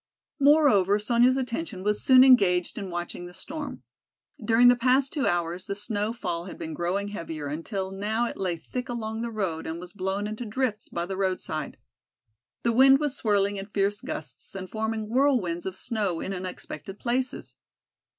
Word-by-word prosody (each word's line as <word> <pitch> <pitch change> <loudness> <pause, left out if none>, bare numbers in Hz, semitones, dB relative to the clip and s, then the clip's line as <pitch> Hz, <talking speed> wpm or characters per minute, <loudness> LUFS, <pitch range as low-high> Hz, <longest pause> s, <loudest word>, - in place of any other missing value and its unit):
Moreover, 275 - +5
Sonya's 240 +4 +3
attention 250 - -3
was 210 +1 0
soon 255 -1 +8
engaged 200 -7 +4
in 195 -2 -5
watching 175 0 -5
the 180 - -13
storm. 295 - -6 0.6
During 235 +2 +5
the 245 - +7
past 255 +3 +2
two 290 - 0
hours 175 +1 -1
the 200 - -2
snow 205 +1 0
fall 175 -7 -4
had 185 - -8
been 160 - -5
growing 185 +5 -1
heavier 165 -6 -6
until 190 +6 -4
now 215 +4 -1
it - - -4
lay 180 -3 -2
thick 250 +10 -6
along 220 -2 -3
the 235 - -2
road 190 -8 -3
and 160 +1 -4
was 180 0 -10
blown 190 +1 -2
into 215 +3 -4
drifts 225 -1 -2
by 170 - -2
the 190 +1 -5
roadside. 190 -1 -2 0.9
The 235 - +2
wind 270 +3 +7
was 295 -3 -1
swirling 205 -2 +1
in 195 0 -6
fierce 205 0 0
gusts 150 - -7
and 185 -1 -5
forming 220 +1 -2
whirlwinds 230 -9 +1
of 190 - -4
snow 205 -7 -1
in 195 - -4
unexpected 185 0 -7
places. 255 +3 -2
205 Hz, 175 wpm, -27 LUFS, 185-240 Hz, 0.9 s, soon